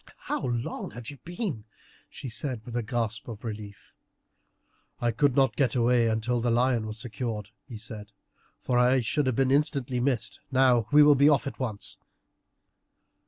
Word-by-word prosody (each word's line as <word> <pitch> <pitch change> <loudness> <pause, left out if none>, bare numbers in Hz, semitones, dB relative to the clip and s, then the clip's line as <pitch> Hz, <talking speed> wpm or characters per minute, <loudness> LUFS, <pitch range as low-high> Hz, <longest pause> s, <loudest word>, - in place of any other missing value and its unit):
"How - - -3
long 120 -4 -3
you - - -14 0.2
have 140 - -14
been!" 175 - -4 0.4
she - - -8
said 125 -1 -4
with 120 -2 -7
a 120 - +1
gasp 115 -1 -3
of 110 -3 -8
relief. 105 -3 -8 1.1
"I 120 -1 +1
could 135 +3 +2
not 135 -5 +3
get 135 -4 +1
away 120 -1 +3
until 115 +2 0
the 120 - +1
lion 120 -1 +2
was 110 0 -6
secured," 110 -2 -4 0.2
he 120 -5 -8
said, 105 -1 -8 0.5
"for 125 -1 +1
I 125 +1 +4
should 135 +4 0
have 130 - +1
been 130 +1 +2
instantly 135 -3 +1
missed. 125 -3 -1
Now 130 -4 +4
we 150 0 +8
will 145 0 +7
be 140 +1 +5
off 145 -2 +3
at 140 - -6
once." 110 -6 -5
120 Hz, 170 wpm, -27 LUFS, 110-135 Hz, 1.1 s, we